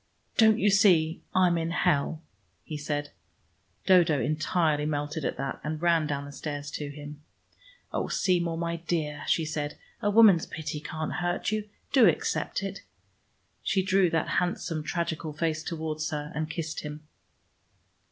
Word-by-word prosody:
"Don't 220 -1 +6
you 210 -2 +3
see 175 -5 +4
I'm 180 -2 +4
in 165 0 -2
hell?" 155 -1 +1 0.4
he 155 - -6
said. 145 0 -3 0.7
Dodo 170 -6 +5
entirely 155 0 +1
melted 150 +1 -2
at - - -2
that, 135 0 -3
and 155 +1 -3
ran 165 -2 +3
down 140 -1 -2
the 145 - -9
stairs 145 0 -5
to 145 -1 -4
him. 145 +1 -9 0.7
"Oh, - - -1
Seymour, 170 -3 +1
my 170 0 -2
dear," 160 -3 -2
she 165 - +2
said. 150 -1 -3 0.2
"A 205 - +2
woman's 205 -6 +6
pity 155 -1 -5
can't 155 +1 -4
hurt 175 +3 -1
you. 215 -1 -2 0.2
Do 255 -6 +7
accept 170 +3 0
it." 195 0 -5 0.8
She 190 - +1
drew 190 -1 +3
that 165 -1 0
handsome 170 -2 -2
tragical 160 -1 -3
face 155 0 -1
towards 155 -1 -3
her, 150 -1 -4
and 155 +1 -2
kissed 160 -1 -4
him. 150 0 -7
160 Hz, 150 wpm, -28 LUFS, 150-175 Hz, 0.8 s, Do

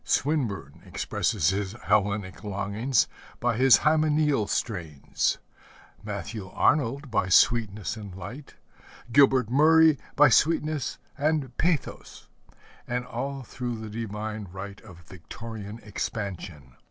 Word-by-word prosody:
Swinburne 110 - -1
expresses 90 -8 0
his 100 0 -2
Hellenic 100 0 0
longings 105 +5 0 0.3
by 120 -1 +1
his 130 +2 +6
hymeneal 150 -6 +2
strains, 85 - -2 0.7
Matthew 105 -1 -6
Arnold 140 +1 +1
by 95 -4 +1
sweetness 110 -1 +3
and 100 -4 -9
light, 110 +11 -9 0.6
Gilbert 130 -3 +4
Murray 155 +2 +5 0.2
by - - +7
sweetness 155 -3 +1 0.2
and 145 -4 0
pathos 165 -2 -2 0.6
and 125 +1 -2
all 135 +2 -4
through 120 -1 -5
the 110 -1 -7
divine 110 -1 -5
right 100 +1 -8
of 90 -6 -14
Victorian 105 +5 -9
expansion. 95 - -5
110 Hz, 105 wpm, -26 LUFS, 100-135 Hz, 0.7 s, by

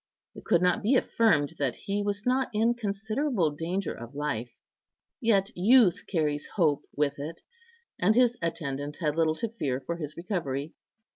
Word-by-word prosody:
It - - -12
could 170 +1 +3
not 180 - +2
be 230 +6 +3
affirmed 215 - +3
that 135 -4 0
he 200 +1 -3
was 205 0 -2
not 255 +1 +1
in 225 +3 +3
considerable 220 - -1
danger 170 +5 -3
of 120 +4 -10
life, 125 -5 -3 0.6
yet 220 -3 +2
youth 210 +1 +4
carries 150 -5 -1
hope 155 -8 +2
with 145 -1 0
it, 160 +4 -6 0.6
and 210 +4 +3
his 245 -1 +4
attendant 145 -3 -3
had 150 -4 0
little 160 -1 +2
to 230 +6 -2
fear 145 - -2
for 170 +6 -4
his 150 -3 -6
recovery. 160 -5 -3
170 Hz, 160 wpm, -28 LUFS, 145-215 Hz, 0.6 s, youth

